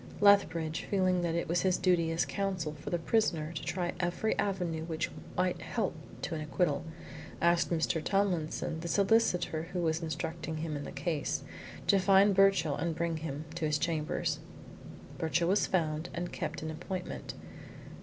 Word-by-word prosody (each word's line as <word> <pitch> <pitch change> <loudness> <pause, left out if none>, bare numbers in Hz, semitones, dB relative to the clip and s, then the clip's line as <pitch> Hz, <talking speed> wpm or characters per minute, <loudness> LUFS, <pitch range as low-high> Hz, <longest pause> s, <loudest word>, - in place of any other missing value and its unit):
Lethbridge, 165 -6 +4
feeling 185 -2 +2
that 170 -1 0
it 170 - -1
was 175 +2 +1
his 185 -1 +2
duty 175 -3 +2
as 165 - +1
Counsel 190 -6 -2
for 150 - -7
the 175 - +1
prisoner 165 -4 +1
to 155 - -4
try 175 -2 -2
every 175 +5 0
avenue 180 -5 -1
which 165 0 -2 0.3
might 180 0 +1
help - - -1 0.3
to - - -2
an 155 - -3
acquittal, 150 0 0 0.6
asked 170 0 +3
Mr. 160 -1 0
Tomlinson, 180 -5 0
the 170 - -5
solicitor 180 -5 +2
who 180 - -1
was 160 0 +1
instructing 160 0 -3
him 155 -1 -3
in 145 - -4
the - - -6
case, 150 +1 -2 0.4
to 200 - +5
find 195 +1 +5
Birchill 195 -6 +4
and 165 +1 -2
bring 165 0 -1
him 155 -1 -5
to 160 - -2
his 150 0 +2
chambers. 155 -1 -1 0.8
Birchill 165 +2 +1
was 200 +2 +3
found 160 -2 0
and 175 0 -3
kept - - -4
an 160 - -3
appointment. 180 +3 -5
170 Hz, 165 wpm, -31 LUFS, 160-185 Hz, 0.8 s, to